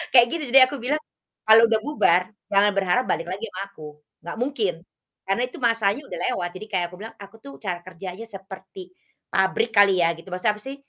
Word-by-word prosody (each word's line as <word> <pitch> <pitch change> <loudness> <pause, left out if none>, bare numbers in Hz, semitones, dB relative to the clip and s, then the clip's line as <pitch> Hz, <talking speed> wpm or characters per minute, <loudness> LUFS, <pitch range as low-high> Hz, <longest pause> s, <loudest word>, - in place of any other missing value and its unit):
kayak 240 -1 +8
gitu. 335 -2 -3
Jadi 270 - +8
aku 285 - -6
bilang 275 +6 -1 0.5
kalau 225 +1 +8
udah 225 -1 +2
bubar, 220 - +3 0.3
jangan 200 +1 +4
berharap 195 +5 +2
balik 165 - -1
lagi 190 +5 -4
sama 185 0 -6
aku, 155 -6 -11 0.4
nggak 170 +5 -7
mungkin 250 -8 0 0.5
karena 195 +5 +1
itu 250 - -11
masanya 230 0 +2
udah - - -7
lewat. 175 -8 -2
Jadi 215 - -8
kayak 180 -3 +1
aku - - -10
bilang, 225 +2 -9
aku 200 +1 -12
tuh 280 0 -10
cara 180 -4 -3
kerjanya 185 +4 -8
seperti 190 -2 -11 0.4
pabrik 190 +4 +1
kali 200 -2 +6
ya 165 - +3
gitu. 165 - -15
Maksudnya 185 +3 +1
apa - - -4
sih? 270 +1 -5
200 Hz, 205 wpm, -23 LUFS, 185-230 Hz, 0.5 s, kayak